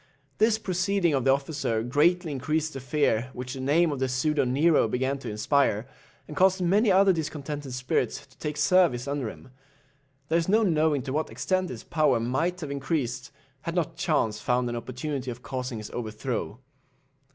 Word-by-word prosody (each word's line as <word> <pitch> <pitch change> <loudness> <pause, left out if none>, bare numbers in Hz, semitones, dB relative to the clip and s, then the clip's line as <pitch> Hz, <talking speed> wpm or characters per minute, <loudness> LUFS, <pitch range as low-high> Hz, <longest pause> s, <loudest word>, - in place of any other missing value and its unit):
This 220 0 +4
proceeding 185 -3 0
of 135 -3 0
the 135 - +5
officer 135 -5 -1
greatly 160 +7 +2
increased 150 +4 -1
the 135 - -5
fear 130 -3 0
which 125 +1 -6
the 135 - -7
name 155 +5 +3
of 140 - -3
the 130 0 0
pseudo 135 +3 +1
Nero 145 +2 +3
began 130 +4 -1
to - - -6
inspire, 110 0 +1 0.4
and 150 - -8
caused 190 +3 +4
many 195 +5 +3
other 190 0 +5
discontented 150 -3 -4
spirits 125 +1 -1
to 130 - -25
take 150 -1 -4
service 150 -5 +3
under 140 -5 -2
him. 130 - -13 0.8
There 165 +1 +3
is 165 - -2
no 220 +3 +4
knowing 155 - +2
to 135 - -4
what 155 +2 -1
extent 185 -1 -1
his 120 -3 -7
power 150 -7 +2
might 160 +10 -1
have 150 -3 -5
increased, 135 -3 -2 0.3
had 170 - -4
not 170 -4 -1
chance 110 -10 0
found 125 +2 +1
an 120 - -3
opportunity 130 +3 -4
of 120 0 -7
causing 130 -2 -4
his 105 -1 -8
overthrow. 115 0 -4
140 Hz, 180 wpm, -27 LUFS, 125-165 Hz, 0.8 s, the